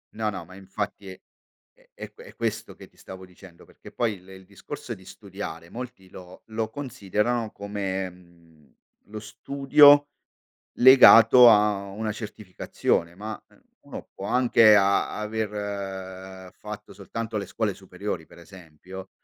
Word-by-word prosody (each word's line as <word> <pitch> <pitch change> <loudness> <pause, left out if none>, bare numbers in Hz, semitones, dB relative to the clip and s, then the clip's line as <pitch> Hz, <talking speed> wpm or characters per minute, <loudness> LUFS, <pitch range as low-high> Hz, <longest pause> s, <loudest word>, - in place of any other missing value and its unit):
No, 110 -1 -1
no, 95 -4 -7
ma 95 +2 -15
infatti 100 +1 -6
è 95 - -13 0.8
è - - -9
q - - -16
è - - -14
questo - - -4
che - - -14
ti - - -32
stavo 95 0 -11
dicendo, 90 -1 -17
perché - - -16
poi 110 -5 -2
le 95 +1 -14
il 95 0 -15
discorso 115 +6 -9
di 95 -3 -14
studiare 95 -4 -9
molti 120 -6 -9
lo 90 0 -14
lo 110 0 -4
considerano 110 -2 -3
come, 100 -2 -4
mhmm, 85 -6 -23 0.3
lo 110 +1 -9
studio 145 +6 +4 0.7
legato 125 -1 +8
a 105 -3 +4
una 110 +2 -4
certificazione, 100 -5 -3
ma 105 +4 -7 0.4
uno - - -10
può 95 - -8
anche 115 -2 +5
a 100 +1 +1
aver 95 -3 -6
fatto - - -10
soltanto 115 -1 -6
le 100 - -4
scuole 105 +1 -3
superiori, 95 -2 -7
per - - -18
esempio, 90 +1 -13
100 Hz, 140 wpm, -25 LUFS, 95-110 Hz, 0.8 s, legato